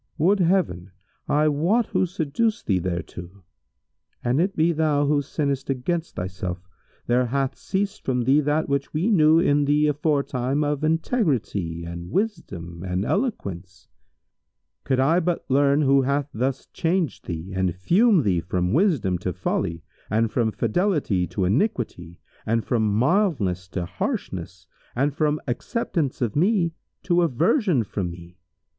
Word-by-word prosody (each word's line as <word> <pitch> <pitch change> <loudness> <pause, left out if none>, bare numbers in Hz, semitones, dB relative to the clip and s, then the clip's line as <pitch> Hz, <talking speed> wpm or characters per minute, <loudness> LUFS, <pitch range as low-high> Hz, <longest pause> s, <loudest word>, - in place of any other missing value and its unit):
Would 190 +6 +3
Heaven 170 - +1 0.4
I 150 +1 +3
wot 170 +11 +2
who 185 - +1
seduced 190 +6 -1
thee 95 -3 +2
thereto! 90 +1 -6 0.8
An 125 +4 +1
it 195 +4 +1
be 165 +2 +3
thou 150 -3 +1
who 145 0 +2
sinnest 140 -1 -2
against 160 +6 -2
thyself, 90 0 -4 0.5
there 125 +1 +2
hath 135 +2 -1
ceased 200 +2 -3
from 125 -2 0
thee 135 +5 +4
that 150 +2 0
which 140 +1 -2
we 180 +9 +1
knew 160 -4 +5
in 145 -4 +3
thee 150 +1 +3
aforetime 145 -2 0
of 145 0 -1
integrity 140 - 0
and 85 +1 -7
wisdom 90 - -3
and 90 +1 -2
eloquence. 95 - -3 1.0
Could 130 -2 +1
I 155 +7 +4
but 175 -1 -1
learn 140 +2 +3
who 135 0 +4
hath 140 +2 -1
thus 130 +4 -2
changed 170 -1 -1
thee 85 +2 -5
and 95 -2 0
fumed 185 - +3
thee 95 -5 +2
from 90 +2 -1
wisdom 135 - +2
to 90 - -2
folly 85 0 -2 0.3
and 110 +1 +1
from 115 -3 +1
fidelity 115 - 0
to 95 - -2
iniquity 100 - -1 0.3
and 115 +1 0
from 110 -4 +1
mildness 125 - +1
to 90 -1 -4
harshness 90 +1 -4 0.3
and 140 +4 +1
from 150 0 +1
acceptation 140 - -1
of 110 - -6
me 175 0 +2 0.3
to 175 -1 +2
aversion 170 - +2
from 100 -3 -3
me! 85 +1 -12
140 Hz, 145 wpm, -24 LUFS, -, 1.0 s, knew